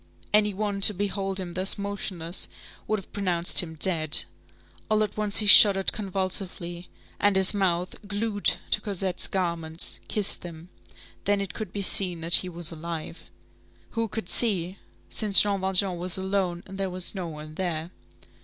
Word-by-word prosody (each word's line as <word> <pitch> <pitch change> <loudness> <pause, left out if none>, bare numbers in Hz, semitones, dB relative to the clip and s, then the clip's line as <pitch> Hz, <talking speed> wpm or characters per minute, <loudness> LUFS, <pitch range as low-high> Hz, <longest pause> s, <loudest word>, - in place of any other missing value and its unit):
Any 210 0 +3
one 200 0 -4
to 205 +1 +7
behold 195 0 -3
him 175 -2 -7
thus 185 +2 0
motionless 190 -4 -4 0.4
would 215 - 0
have 195 - -11
pronounced 180 -4 +2
him 160 -3 -1
dead; 155 -2 +1 0.7
all 215 0 +2
at 210 -1 -5
once 210 -1 +3
he 215 - +4
shuddered 200 -2 +8
convulsively, 185 -3 -4 0.3
and 205 -1 +2
his 190 +1 +4
mouth, 185 -3 -1
glued 205 0 0 0.2
to 210 - +2
Cosette's 195 -3 -1
garments, 170 -3 -2
kissed 210 -2 0
them; 170 0 -11 0.6
then 205 0 +1
it 195 -5 -5
could 215 -5 -7
be 200 0 -3
seen 180 -3 +2
that 165 +1 +7
he 185 - 0
was 170 -1 -2
alive. 165 0 -8 0.6
Who 230 0 -2
could 215 -3 -6
see? 190 -5 0 0.3
Since 210 -3 +5
Jean 200 -2 -2
Valjean 190 -1 +1
was 180 0 +1
alone, 190 -2 -2
and 195 +1 -10
there 195 -1 -2
was 180 0 -2
no 185 -4 -5
one 155 -1 -10
there. 170 -1 -4
190 Hz, 165 wpm, -25 LUFS, 175-205 Hz, 0.7 s, shuddered